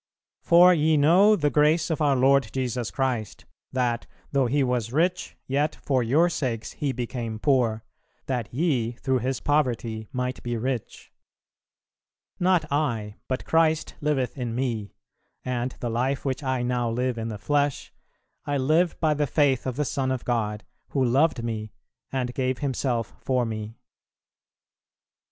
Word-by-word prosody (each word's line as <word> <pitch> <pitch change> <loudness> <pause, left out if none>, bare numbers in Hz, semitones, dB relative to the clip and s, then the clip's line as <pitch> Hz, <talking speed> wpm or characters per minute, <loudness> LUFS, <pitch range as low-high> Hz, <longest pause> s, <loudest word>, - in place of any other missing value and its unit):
"For 175 +2 +7
ye 155 -1 +3
know 180 +9 +6
the 150 -6 +1
grace 155 +4 +3
of 160 - -1
our 145 -2 +3
Lord 135 -1 +3
Jesus 125 -3 -2
Christ, 125 -6 -2 0.3
that, 120 -2 -1 0.2
though 135 -3 +2
He 140 +3 +2
was 125 -3 -1
rich, 175 +6 0
yet 145 +3 0
for 130 -3 0
your 145 +9 +3
sakes 120 -9 -3
He 145 -2 -2
became 120 -3 -4
poor, 115 -4 +1 0.4
that 125 -5 -3
ye 125 -5 0
through 130 +1 -1
His 130 +2 -2
poverty 120 -7 0
might 125 0 -3
be 120 -1 -3
rich." 125 0 -4 1.3
"Not 180 -3 +3
I, 115 -8 -1
but 130 0 -3
Christ 160 -1 +2
liveth 140 -5 0
in 120 -2 -3
me, 115 -5 -3 0.5
and 125 0 -2
the 120 - -2
life 130 +5 -1
which 130 0 -1
I 130 -3 -1
now 120 -1 0
live 125 +1 -1
in 115 - -3
the 110 -2 -5
flesh, 145 +5 -1 0.5
I 145 0 -1
live 155 +6 +2
by 155 -2 +2
the 145 0 0
faith 135 -2 +2
of 130 - -2
the 150 +2 0
Son 135 -1 -1
of 130 -2 -3
God, 105 -3 -1 0.2
who 135 -2 0
loved 130 +1 +2
me 110 -2 -4 0.4
and 125 -2 -2
gave 130 -1 -1
Himself 125 -6 -2
for 130 -2 0
me." 110 0 -5
130 Hz, 155 wpm, -25 LUFS, 120-145 Hz, 1.3 s, For